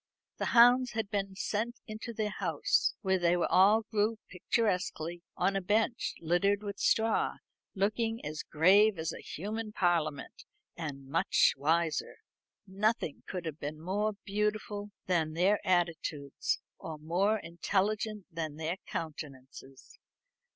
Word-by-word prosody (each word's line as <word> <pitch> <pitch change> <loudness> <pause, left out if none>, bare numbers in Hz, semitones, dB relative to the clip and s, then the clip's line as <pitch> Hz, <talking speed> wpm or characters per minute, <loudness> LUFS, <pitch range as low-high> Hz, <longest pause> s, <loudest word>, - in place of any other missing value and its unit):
The - - -2
hounds 245 +1 +7
had 220 -3 -3
been 195 -2 -2
sent 220 +4 -2
into 220 +1 -6
their 215 -2 -2
house, - - +1
where 190 -2 +1
they 175 0 +3
were 175 - +1
all 210 +4 +6
grouped 220 +1 0
picturesquely 180 -4 -1 0.2
on 195 - +1
a 195 - +1
bench 220 +5 0
littered 195 +5 +1
with 200 -1 -5
straw, 220 0 +2 0.4
looking 225 +3 0
as 150 +1 -4
grave 195 +6 +4
as 160 0 -2
a - - -8
human 215 +5 -5
parliament, 165 -7 0 0.3
and 145 -5 -6
much 150 +5 +3
wiser. 160 +3 0 0.5
Nothing 200 -4 -1
could 180 -2 -4
be 145 - -3
more 195 +7 -1
beautiful 210 0 -2 0.2
than 160 -4 +1
their 190 +5 +3
attitudes, 165 -5 0 0.2
or 160 -1 -6
more 180 +8 +1
intelligent 200 +4 -1
than 160 -3 -4
their 160 +3 -3
countenances. 135 -4 -8
190 Hz, 130 wpm, -31 LUFS, 165-215 Hz, 0.5 s, hounds